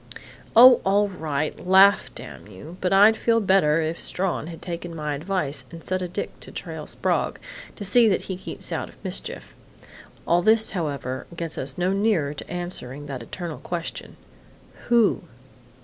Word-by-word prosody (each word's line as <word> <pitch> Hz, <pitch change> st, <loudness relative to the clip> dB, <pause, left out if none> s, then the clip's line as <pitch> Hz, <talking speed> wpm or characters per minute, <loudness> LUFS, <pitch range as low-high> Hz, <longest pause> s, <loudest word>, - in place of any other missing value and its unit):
Oh, 245 Hz, +1 st, +9 dB
all 200 Hz, +1 st, +2 dB
right! 155 Hz, -5 st, -3 dB
Laugh, 190 Hz, +2 st, +5 dB
damn -, -, -9 dB
you! 125 Hz, -, -11 dB
But 180 Hz, -, 0 dB
I'd 205 Hz, +3 st, +6 dB
feel 230 Hz, +1 st, +2 dB
better 190 Hz, -6 st, +3 dB
if 160 Hz, +1 st, -3 dB
Strawn 180 Hz, -4 st, -1 dB
had 165 Hz, -1 st, -8 dB
taken 170 Hz, -1 st, -6 dB
my 150 Hz, -2 st, -3 dB
advice 155 Hz, -1 st, -2 dB
and 165 Hz, -1 st, -11 dB
set 185 Hz, 0 st, -2 dB
a 180 Hz, -, -2 dB
dick 175 Hz, -, -5 dB
to -, -, -11 dB
trail -, -, -7 dB
Sprague, -, -, -1 dB, 0.4 s
to 205 Hz, -, -6 dB
see 235 Hz, +4 st, +5 dB
that 195 Hz, -, +1 dB
he 190 Hz, -, -5 dB
keeps 185 Hz, -, -6 dB
out -, -, -3 dB
of -, -, -18 dB
mischief.... -, -, -4 dB, 0.7 s
All 175 Hz, +1 st, +3 dB
this, 220 Hz, +3 st, +4 dB
however, 140 Hz, -7 st, -4 dB
gets 165 Hz, -2 st, -4 dB
us 135 Hz, 0 st, -5 dB
no 180 Hz, +2 st, +1 dB
nearer 195 Hz, -8 st, +1 dB
to 150 Hz, -, -10 dB
answering 145 Hz, -6 st, -5 dB
that 135 Hz, -4 st, -6 dB
eternal 165 Hz, +6 st, -7 dB
question 170 Hz, -2 st, -6 dB, 0.7 s
'Who?'" 235 Hz, -4 st, +3 dB
175 Hz, 165 wpm, -24 LUFS, 150-195 Hz, 0.7 s, Oh